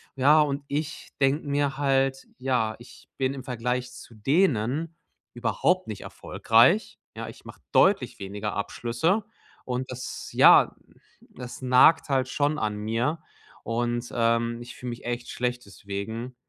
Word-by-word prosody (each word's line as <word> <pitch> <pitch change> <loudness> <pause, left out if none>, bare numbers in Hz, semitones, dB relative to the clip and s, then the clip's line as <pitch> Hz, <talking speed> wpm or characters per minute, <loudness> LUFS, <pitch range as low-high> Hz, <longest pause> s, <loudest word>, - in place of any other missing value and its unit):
Ja, 145 +4 +5
und 140 -1 -1
ich 145 +1 -4
denke 140 +3 +2
mir 140 -1 0
halt: 135 -1 +1
„Ja, 125 -4 0
ich 120 -1 -16
bin 130 0 0
im 135 -2 -7
Vergleich 125 0 -2
zu 125 -1 -13
denen 140 - +1 0.4
überhaupt 150 +9 0
nicht 110 - -6
erfolgreich“, 120 - +2 0.2
ja? - - -6
Ich - - -14
mache - - -12
deutlich 185 -11 +3
weniger 100 +1 -4
Abschlüsse 120 - -1 0.4
und 130 +1 -3
das, 130 0 -6
ja, - - +7 0.5
das 125 0 -10
nagt 130 +5 +5
halt 130 -1 +1
schon 145 +2 0
an 105 -1 -2
mir 115 +9 -1 0.4
und, 120 +1 -2
ähm, 115 0 +1
ich 120 - -11
fühle 125 - -6
mich 120 - -9
echt 120 0 -4
schlecht 125 0 -3
deswegen. 105 +6 -6
125 Hz, 140 wpm, -26 LUFS, 115-140 Hz, 0.5 s, ja